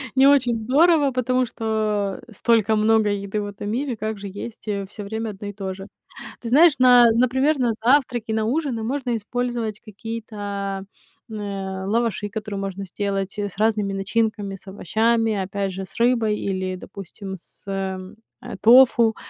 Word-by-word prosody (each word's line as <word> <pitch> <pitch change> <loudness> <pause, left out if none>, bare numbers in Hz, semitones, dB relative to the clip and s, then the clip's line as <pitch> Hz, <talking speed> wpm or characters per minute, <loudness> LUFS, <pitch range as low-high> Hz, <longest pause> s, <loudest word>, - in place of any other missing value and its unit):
не 265 +1 +6
очень 255 -5 +4
здорово, 285 +5 +3
потому 255 0 +1
что 215 -4 -2
столько 220 0 +2
много 215 0 +3
еды 200 +1 -2
в - - -4
этом 205 0 -6
мире, 250 +3 -2
как 215 0 -3
же 200 0 -7
есть, 205 +4 -8
э, 200 -2 -2
всё 205 +1 -8
время 220 +2 -4
1 205 0 -7
и 205 - -6
то 195 -2 -5
же? 195 +1 -10 0.5
Ты 235 - -5
знаешь, 310 +6 +7
на 245 -2 +7
например, 260 +6 +2
на 245 -2 +2
завтраки, 245 -3 +2
на 220 0 0
ужины 255 -2 -1
можно 250 0 -1
использовать 230 -1 -3
какие-то, 205 -3 -5 0.5
э, - - -7
лаваши, 200 +2 -2
которые 210 -1 -5
можно 195 0 -4
сделать 195 +1 -3
с 205 -2 -4
разными 210 -2 +1
начинками, 205 0 -1
с 195 - -17
овощами, 220 +4 +1
опять 195 0 -2
же, 190 +1 -5
с - - -17
рыбой 230 -3 +2
или, 185 -1 -2
допустим, 195 +1 -8
с, 175 - -14
эм, 190 0 -4 0.3
а, - - -7
тофу. 235 0 +6
215 Hz, 160 wpm, -23 LUFS, 200-235 Hz, 0.5 s, знаешь